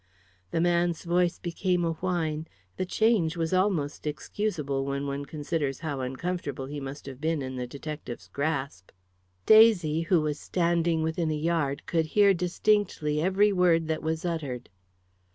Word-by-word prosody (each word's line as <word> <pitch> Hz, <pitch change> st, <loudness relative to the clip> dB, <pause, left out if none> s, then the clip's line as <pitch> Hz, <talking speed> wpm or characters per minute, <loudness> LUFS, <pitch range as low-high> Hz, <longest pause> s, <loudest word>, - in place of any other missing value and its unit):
The 165 Hz, -, -1 dB
man's 175 Hz, -1 st, +1 dB
voice 175 Hz, 0 st, +1 dB
became 180 Hz, 0 st, -1 dB
a 165 Hz, -, +1 dB
whine; 160 Hz, -2 st, -2 dB, 0.3 s
the 185 Hz, -, -3 dB
change 200 Hz, -7 st, +2 dB
was 165 Hz, +1 st, -1 dB
almost 180 Hz, -7 st, 0 dB
excusable 150 Hz, -3 st, -2 dB
when 140 Hz, +1 st, -2 dB
one 140 Hz, 0 st, -3 dB
considers 145 Hz, -2 st, -3 dB
how 145 Hz, -4 st, -3 dB
uncomfortable 135 Hz, +1 st, -3 dB
he 145 Hz, +2 st, -6 dB
must 135 Hz, +1 st, -7 dB
have 135 Hz, -1 st, -9 dB
been 160 Hz, -2 st, 0 dB
in 130 Hz, 0 st, -5 dB
the 125 Hz, -1 st, -4 dB
detective's 140 Hz, -2 st, -7 dB
grasp. 140 Hz, -, -3 dB, 0.6 s
Daisy, 195 Hz, -8 st, +6 dB
who 170 Hz, +1 st, +3 dB
was 150 Hz, -1 st, -2 dB
standing 170 Hz, -2 st, +1 dB
within 160 Hz, 0 st, -1 dB
a 155 Hz, -, 0 dB
yard, 150 Hz, -3 st, -1 dB
could 165 Hz, -2 st, 0 dB
hear 200 Hz, +3 st, +5 dB
distinctly 175 Hz, -4 st, +1 dB
every 195 Hz, +4 st, +3 dB
word 170 Hz, -3 st, +3 dB
that 160 Hz, -1 st, -1 dB
was 160 Hz, +2 st, -2 dB
uttered. 145 Hz, -8 st, -3 dB
160 Hz, 155 wpm, -27 LUFS, 145-175 Hz, 0.6 s, Daisy